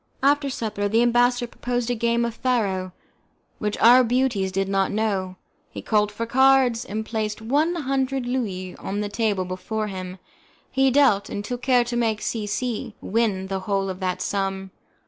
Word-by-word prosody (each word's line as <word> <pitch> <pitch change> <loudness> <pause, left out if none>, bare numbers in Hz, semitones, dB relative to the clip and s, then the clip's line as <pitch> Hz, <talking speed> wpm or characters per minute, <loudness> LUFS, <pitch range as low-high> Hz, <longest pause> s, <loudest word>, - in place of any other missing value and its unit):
After 285 0 +3
supper, 215 -5 -2
the 225 +3 +3
ambassador 245 +1 +3
proposed 245 0 -3
a - - +2
game 235 0 +1
of 235 - -3
faro, 200 -7 -1 0.7
which 210 0 -2
our 245 +3 +7
beauties 235 -5 +1
did 195 +1 -1
not 195 0 +1
know; 200 -4 -1 0.3
he - - -8
called 210 -1 +2
for 230 +2 -4
cards, 260 -1 +4
and 215 +2 -4
placed 215 -2 -3
one 290 +10 +1
hundred 270 -3 -1
Louis 200 -8 -3
on 205 +2 -4
the 205 - -3
table 200 -2 0
before 185 +4 -3
him; 185 -1 -6 0.5
he 270 0 +3
dealt, 255 -7 +3
and 205 - -4
took 245 +1 -4
care 250 -1 +3
to 240 0 -4
make 225 -3 +1
C 215 -3 -2
C 220 0 -3
win 205 -3 0
the 190 0 -3
whole 195 -1 0
of 185 - -8
that 185 -1 -2
sum. 195 -1 -2
220 Hz, 175 wpm, -23 LUFS, 195-245 Hz, 0.7 s, our